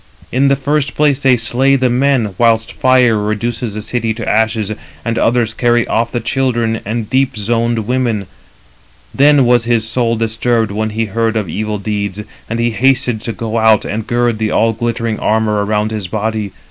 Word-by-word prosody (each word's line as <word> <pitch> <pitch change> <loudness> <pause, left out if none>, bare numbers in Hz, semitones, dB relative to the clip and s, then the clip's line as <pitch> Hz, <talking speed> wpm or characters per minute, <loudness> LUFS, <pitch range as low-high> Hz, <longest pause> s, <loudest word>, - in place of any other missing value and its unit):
In 135 +3 +2
the 140 - +3
first 140 +1 -1
place, 145 -2 +2
they 130 -2 +4
slay 130 +4 +2
the 130 -1 +2
men, 130 +2 +2
327 100 -3 -5
whilst 115 -1 +2
fire 125 -3 +3
reduces 110 +1 -3
the 105 - -5
city 115 -1 -2
to 115 - -6
ashes; 110 -1 +1 0.3
and 115 0 -1
others 115 -1 +1
carry 120 -1 +2
off 115 +1 0
the 120 - -1
children 115 -2 -1
and 110 0 -2
deep 130 +1 0
zoned 115 +1 0
women. 120 -4 -1 0.9
Then 145 -1 +4
was 120 -1 +3
his 115 -2 +1
soul 115 0 0
disturbed 115 0 0
when 110 +2 -2
he 110 +1 -2
heard 115 +2 -1
of 105 -4 -2
evil 105 +4 -3
deeds, 100 -1 -3 0.3
and 115 +1 -2
he 120 0 +1
hasted 125 -1 +1
to 115 - -4
go 115 0 -3
and 110 -1 +2
gird 120 -2 0
the 110 -1 0
all 115 +1 +2
glittering 115 -1 -2
armour 105 -1 +1
around 105 +1 -1
his 105 -4 -4
body. 110 0 -3
115 Hz, 185 wpm, -15 LUFS, 110-120 Hz, 0.9 s, they